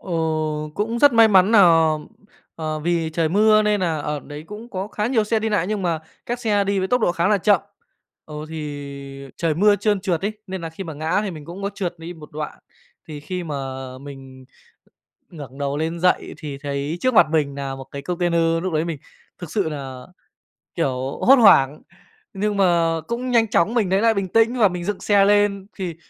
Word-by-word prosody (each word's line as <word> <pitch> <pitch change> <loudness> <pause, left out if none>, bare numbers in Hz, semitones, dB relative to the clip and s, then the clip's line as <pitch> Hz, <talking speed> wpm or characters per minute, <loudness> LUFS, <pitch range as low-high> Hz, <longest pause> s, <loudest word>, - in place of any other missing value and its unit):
Ờ, 190 - -10 0.6
cũng 225 +3 -2
rất 285 +1 +6
may 230 -1 +6
mắn 190 -1 +5
nà, 225 - +6 1.0
ờ, 155 -1 -3
vì 165 0 -1
trời 160 0 0
mưa 215 +4 +4
nên 210 -1 +1
nà 165 -4 0
ở 150 0 -3
đấy 145 +2 -9
cũng 210 +5 -9
có 190 -1 -4
khá 210 0 -2
nhiều 230 -3 +1
xe 220 +1 +1
đi 220 +1 -2
nại 205 -5 0
nhưng 210 0 -2
mà 170 -3 -1 0.3
các 240 0 -2
xe 205 -3 +1
đi 200 0 0
với 190 0 -1
tốc 250 - +2
độ 175 - +2
khá 170 +1 +1
là 210 -1 +3
chậm, 200 -1 +3 0.6
ờ, 155 - -11
thì 140 -3 -7
trời 165 -2 0
mưa 205 +5 +4
trơn 205 -2 0
trượt 180 -4 -1
ấy, 210 - -1
nên 190 -1 -5
nà 165 - -5
khi 175 +4 -8
mà 165 - -6
ngã 160 +6 0
thì 205 - -3
mình 155 -4 -9
cũng 175 +5 -9
có 200 - -2
trượt 180 -3 -4
đi 165 +2 -7
một 155 -2 -14
đoạn. 150 0 -6 0.5
Thì 150 -2 -7
khi 180 +4 -5
mà 155 -3 -5 0.4
mình 135 -1 -11 0.9
ngẩng 140 -6 -10
đầu 140 0 -2
lên 165 +2 -2
dậy 180 +1 +1
thì 145 -3 -7
thấy 140 +3 -4
trước 255 -1 +1
mặt 170 - +6
mình 145 -3 0
nà 135 -1 -4
một 135 - -8
cái 140 - -6
container, 170 0 0
lúc 185 - -2
đấy 155 +1 0
mình 165 -3 -4 0.4
thực 175 -4 -9
sự 200 -3 0
nà, 135 -3 -6 0.8
kiểu, 135 -5 -2
hốt 270 - +9
hoảng, 150 - +5 0.5
nhưng 205 +1 -1
mà 170 -4 +3
cũng 245 +2 -3
nhanh 230 -2 +4
chóng 205 0 +2
mình 220 -6 +1
lấy 190 +2 +2
lại 230 0 +4
bình 195 -2 -2
tĩnh 225 +5 +2
và 210 - +6
mình 180 -2 -5
dựng 205 0 -2
xe 200 -1 +4
lên 205 -1 +2
thì, 180 -5 -4
175 Hz, 215 wpm, -22 LUFS, 155-205 Hz, 1.0 s, hốt